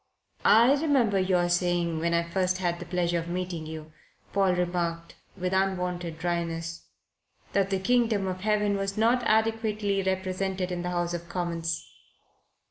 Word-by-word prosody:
"I 235 Hz, +5 st, +7 dB
remember 250 Hz, -10 st, +3 dB
your 185 Hz, -2 st, +2 dB
saying, 175 Hz, -2 st, +1 dB
when 170 Hz, +1 st, +1 dB
I 170 Hz, -, +2 dB
first 185 Hz, +1 st, 0 dB
had 175 Hz, -2 st, -1 dB
the 175 Hz, -, -8 dB
pleasure 175 Hz, -1 st, 0 dB
of 165 Hz, -, -6 dB
meeting 175 Hz, -2 st, -3 dB
you," 155 Hz, 0 st, -8 dB, 0.4 s
Paul 195 Hz, -2 st, +3 dB
remarked, 175 Hz, -1 st, -2 dB, 0.2 s
with 180 Hz, 0 st, -2 dB
unwonted 180 Hz, -3 st, -1 dB
dryness, 165 Hz, -1 st, -3 dB, 0.7 s
"that 195 Hz, -1 st, +2 dB
the 195 Hz, -, +1 dB
Kingdom 225 Hz, -1 st, +2 dB
of 185 Hz, -1 st, -3 dB
Heaven 210 Hz, -1 st, +1 dB
was 195 Hz, +1 st, -3 dB
not 235 Hz, +3 st, +3 dB
adequately 215 Hz, -2 st, +1 dB
represented 190 Hz, 0 st, -2 dB
in 175 Hz, -1 st, -2 dB
the 180 Hz, -, -3 dB
House 175 Hz, -1 st, -1 dB
of 170 Hz, 0 st, -5 dB
Commons." 170 Hz, -2 st, -2 dB
180 Hz, 150 wpm, -27 LUFS, 170-195 Hz, 0.7 s, I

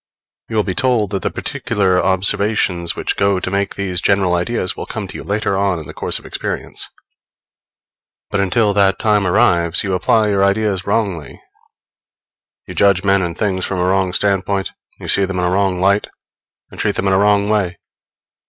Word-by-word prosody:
You 115 Hz, -, -4 dB
will 105 Hz, -, +3 dB
be 95 Hz, -, -3 dB
told 115 Hz, -3 st, +1 dB
that 95 Hz, -2 st, -2 dB
the -, -, -1 dB
particular 100 Hz, -7 st, 0 dB
observations 95 Hz, -2 st, +1 dB
which -, -, -2 dB
go 100 Hz, -1 st, +1 dB
to 95 Hz, -, -4 dB
make 100 Hz, 0 st, -1 dB
these 95 Hz, -2 st, -2 dB
general 95 Hz, -3 st, +2 dB
ideas 90 Hz, +2 st, -1 dB
will -, -, -7 dB
come -, -, -5 dB
to -, -, -11 dB
you -, -, -7 dB
later 100 Hz, -1 st, -1 dB
on 95 Hz, -2 st, +1 dB
in 80 Hz, -, -7 dB
the -, -, -9 dB
course -, -, 0 dB
of -, -, -13 dB
experience; -, -, -4 dB, 1.4 s
but 100 Hz, -, 0 dB
until 100 Hz, +2 st, +2 dB
that 100 Hz, -1 st, +3 dB
time 105 Hz, -3 st, +2 dB
arrives, 85 Hz, -1 st, +3 dB
you 95 Hz, -, -2 dB
apply 95 Hz, +5 st, +2 dB
your 105 Hz, -2 st, +1 dB
general 100 Hz, -, +4 dB
ideas 100 Hz, -2 st, -1 dB
wrongly, 100 Hz, -8 st, -2 dB, 1.3 s
you -, -, -8 dB
judge 100 Hz, -2 st, +3 dB
men 100 Hz, -1 st, +3 dB
and 85 Hz, -1 st, -3 dB
things 95 Hz, -3 st, -1 dB
from 95 Hz, -, -2 dB
a 90 Hz, -, +1 dB
wrong 95 Hz, 0 st, +1 dB
standpoint, 95 Hz, 0 st, 0 dB, 0.3 s
you -, -, -8 dB
see 100 Hz, -, +3 dB
them 95 Hz, -1 st, -4 dB
in 90 Hz, -, 0 dB
a 90 Hz, -, 0 dB
wrong 95 Hz, -1 st, +1 dB
light, 100 Hz, +2 st, +2 dB, 0.6 s
and -, -, -12 dB
treat -, -, 0 dB
them 100 Hz, -, -2 dB
in 95 Hz, -, +2 dB
a 95 Hz, -, +3 dB
wrong 100 Hz, 0 st, +3 dB
way. 100 Hz, -5 st, 0 dB
95 Hz, 195 wpm, -17 LUFS, 90-100 Hz, 1.4 s, general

